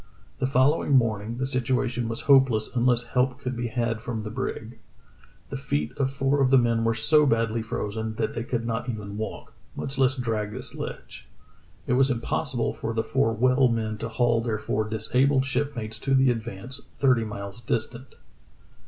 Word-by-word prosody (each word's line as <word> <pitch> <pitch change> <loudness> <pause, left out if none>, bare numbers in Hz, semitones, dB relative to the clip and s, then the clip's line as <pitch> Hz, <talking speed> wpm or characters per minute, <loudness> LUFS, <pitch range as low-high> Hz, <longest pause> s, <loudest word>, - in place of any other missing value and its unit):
The 130 - +1
following 135 +3 +2
morning 115 -2 +1
the 130 - -1
situation 125 -2 -1
was 115 - -3
hopeless 130 -6 +4
unless 120 0 +3
help 125 +2 0
could 130 -2 -4
be 120 0 -2
had 115 -2 -1
from 115 -2 -4
the 105 - -5
brig. 115 -1 -5 0.7
The - - -3
feet 75 +1 -2
of 135 -2 +1
four 135 +1 +1
of 130 - +4
the 135 - +6
men 115 -2 +2
were 115 0 +1
so 150 +6 +4
badly 115 -2 +1
frozen 110 0 -4
that - - -1
they 115 - -3
could 115 -1 -2
not 120 +2 -2
even 105 -3 -5
walk, 110 +1 -6 0.2
much 135 0 -4
less 130 -1 +4
drag 110 -5 -2
the - - -6
sledge. - - -7 0.6
It - - 0
was 135 +2 +4
impossible 125 +1 -1
for 115 - -4
the 110 - +1
four 135 -2 +1
well 125 +4 +3
men 110 -2 -2
to 115 - -4
haul 115 0 +2
their 115 -2 -1
four 110 0 -2
disabled 130 +5 +2
shipmates 120 -6 -3
to 135 +4 +1
the 130 -1 +4
AdvancCy 115 +3 -6
thirty 130 -4 +3
miles 100 0 -7
distant. 120 +2 -3
120 Hz, 180 wpm, -26 LUFS, 110-130 Hz, 0.7 s, the